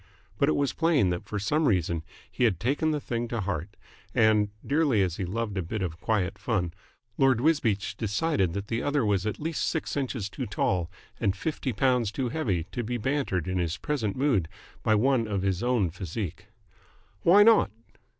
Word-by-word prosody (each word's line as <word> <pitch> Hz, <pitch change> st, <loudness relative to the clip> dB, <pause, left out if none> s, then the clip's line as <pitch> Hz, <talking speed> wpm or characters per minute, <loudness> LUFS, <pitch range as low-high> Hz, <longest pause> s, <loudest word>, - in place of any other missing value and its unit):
But 140 Hz, -, +4 dB
it -, -, +2 dB
was 140 Hz, -1 st, 0 dB
plain 155 Hz, -, +3 dB
that 90 Hz, -, -3 dB
for 105 Hz, -, -3 dB
some 150 Hz, +9 st, +1 dB
reason 85 Hz, -5 st, +1 dB, 0.3 s
he -, -, -1 dB
had 100 Hz, -8 st, +2 dB
taken 140 Hz, +6 st, +1 dB
the 150 Hz, -1 st, 0 dB
thing 120 Hz, -3 st, -3 dB
to 115 Hz, 0 st, -3 dB
heart, 90 Hz, -1 st, -4 dB, 0.4 s
and, 110 Hz, -2 st, +4 dB, 0.2 s
dearly 140 Hz, -8 st, +3 dB
as 90 Hz, -2 st, -2 dB
he 95 Hz, -, -2 dB
loved 105 Hz, +1 st, -2 dB
a -, -, +1 dB
bit 95 Hz, +4 st, -3 dB
of 85 Hz, -2 st, -5 dB
quiet 105 Hz, -5 st, 0 dB
fun, 90 Hz, -8 st, -1 dB, 0.5 s
Lord 135 Hz, -3 st, +4 dB
Wisbeach 110 Hz, -9 st, +1 dB
decided 100 Hz, -, 0 dB
that 100 Hz, +1 st, -3 dB
the 115 Hz, +1 st, -1 dB
other 145 Hz, -4 st, +1 dB
was 100 Hz, -1 st, +1 dB
at 110 Hz, -, -3 dB
least 160 Hz, +1 st, -2 dB
six 160 Hz, -, -2 dB
inches 130 Hz, -7 st, -2 dB
too 125 Hz, +4 st, -5 dB
tall 90 Hz, -4 st, 0 dB, 0.3 s
and 100 Hz, -4 st, 0 dB
fifty 145 Hz, +1 st, -2 dB
pounds 125 Hz, -2 st, +2 dB
too 130 Hz, +1 st, -2 dB
heavy 105 Hz, -, -1 dB
to 120 Hz, -, -3 dB
be 120 Hz, +2 st, -2 dB
bantered 120 Hz, -, -1 dB
in 90 Hz, 0 st, -1 dB
his 85 Hz, -1 st, -1 dB
present 115 Hz, -10 st, -2 dB
mood 130 Hz, -, +1 dB, 0.3 s
by 110 Hz, -, +3 dB
one 120 Hz, +1 st, +2 dB
of 100 Hz, -3 st, -1 dB
his 95 Hz, -2 st, 0 dB
own 120 Hz, -8 st, +1 dB
physique. 90 Hz, 0 st, -5 dB, 0.7 s
"Why 195 Hz, +5 st, +7 dB
not?" 225 Hz, -, +6 dB
110 Hz, 190 wpm, -27 LUFS, 95-135 Hz, 0.7 s, Why